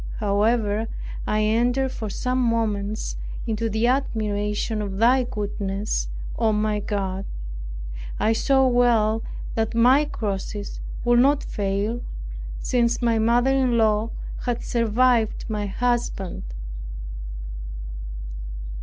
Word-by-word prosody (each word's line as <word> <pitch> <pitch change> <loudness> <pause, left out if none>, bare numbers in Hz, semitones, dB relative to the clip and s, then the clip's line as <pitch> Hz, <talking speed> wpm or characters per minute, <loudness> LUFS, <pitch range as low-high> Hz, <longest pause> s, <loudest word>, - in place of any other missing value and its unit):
However, 210 +1 +2 0.4
I 215 0 +2
entered 245 +5 +2
for 220 -4 -4
some 255 +5 -1
moments 215 -3 0 0.3
into 225 0 0
the 220 +2 +1
admiration 215 -4 0
of 195 -2 -3
thy 250 +4 +5
goodness, 205 -2 -2 0.3
O 225 -2 +4
my 210 0 +1
God. 195 -2 -2 1.0
I 220 - +3
saw 265 +3 +4
well 230 -3 +4 0.3
that 225 0 0
my 255 +6 +6
crosses 205 -4 -3 0.3
would 240 0 +5
not 280 +3 +4
fail, 205 +3 -1 0.6
since 240 -1 +1
my 230 -1 +3
mother 240 +4 +4
in 260 -3 +3
law 220 0 +3 0.4
had 240 -1 0
survived 230 0 +2
my 210 -2 -1
husband. 230 - -1
225 Hz, 105 wpm, -24 LUFS, 210-240 Hz, 1.0 s, my